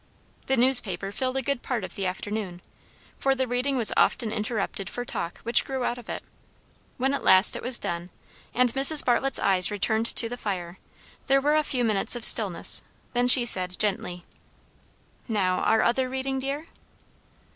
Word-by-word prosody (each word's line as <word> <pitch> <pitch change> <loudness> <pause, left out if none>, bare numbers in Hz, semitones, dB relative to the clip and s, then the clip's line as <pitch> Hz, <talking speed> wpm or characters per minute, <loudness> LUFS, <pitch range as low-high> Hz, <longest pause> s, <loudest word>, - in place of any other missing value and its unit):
The 265 - 0
newspaper 225 -7 +4
filled 260 +4 -4
a 265 - -3
good 280 -1 -3
part 240 -5 -4
of 185 - -8
the 195 -1 -4
afternoon; 190 -1 -6 0.6
for 270 0 0
the 260 -1 -2
reading 250 +3 -2
was 230 -3 +3
often 225 -4 0
interrupted 210 -2 -4
for 245 - -6
talk 170 -7 -6
which 235 +1 +2
grew 265 -2 -5
out 245 0 -3
of 245 - -15
it. - - -6 0.7
When 265 +2 -1
at 280 - -4
last 190 +1 +5
it - - -6
was 250 0 0
done, 175 -2 -6 0.4
and 245 -1 +1
Mrs. 275 +3 +6
Bartlett's 255 +2 +1
eyes 185 -2 +3
returned 220 +2 -1
to 230 - +5
the 245 +2 -7
fire, 185 -5 -6 0.5
there 275 0 +3
were 295 +2 0
a 310 - +3
few 260 -4 -3
minutes 215 0 +1
of 240 -1 +1
stillness; 200 -7 +2 0.3
then 245 0 0
she 250 -1 +7
said 185 -5 0
gently, 180 -4 -3 1.0
"Now, 190 -5 -1
our 225 - +1
other 255 +2 0
reading, 265 +1 -4
dear?" 280 +4 -5
235 Hz, 180 wpm, -24 LUFS, 195-260 Hz, 1.0 s, she